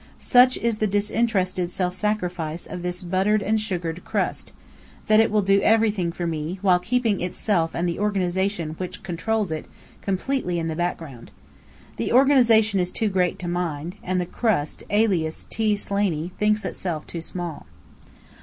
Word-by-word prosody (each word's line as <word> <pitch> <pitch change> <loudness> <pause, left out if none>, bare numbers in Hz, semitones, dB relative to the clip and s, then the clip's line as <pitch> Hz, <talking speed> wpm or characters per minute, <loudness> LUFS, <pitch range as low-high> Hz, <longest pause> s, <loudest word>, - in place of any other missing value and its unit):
Such 250 0 +5
is 230 -2 -1
the 215 - +2
disinterested 200 -3 0
self 180 0 -1
sacrifice 180 -5 -2
of 180 - -7
this 180 +1 -3
buttered 195 +4 +1
and 215 +2 +1
sugared 175 -5 -3
Crust, - - -2 0.5
that 215 0 +5
it 225 - +4
will 210 -1 +2
do 195 +1 +4
everything 215 -6 +2
for 175 +1 -4
me, 165 +2 -3
while 180 -2 +5
keeping 225 +1 0
itself 175 -2 0
and 175 +1 0
the 170 - -2
Organization 190 -4 0
which 180 -1 -6
controls 205 +2 -1
it, 155 - -4 0.3
completely 195 -1 -1
in 165 - -2
the 160 - -3
background. 165 -7 -4 0.7
The 115 - -1
Organization 235 -6 +5
is 180 -1 0
too 220 +3 -1
great 185 -2 +1
to 180 - -6
mind; 175 -1 -3
and 185 0 -1
the 180 - -1
Crust, 180 -7 -1
alias 190 -7 +1
T. 215 -1 +1
Slaney, 195 -5 -1
thinks 210 +1 +2
itself 165 -5 -3
too 170 - -6
small. 170 -2 -6
185 Hz, 160 wpm, -24 LUFS, 175-215 Hz, 0.7 s, Such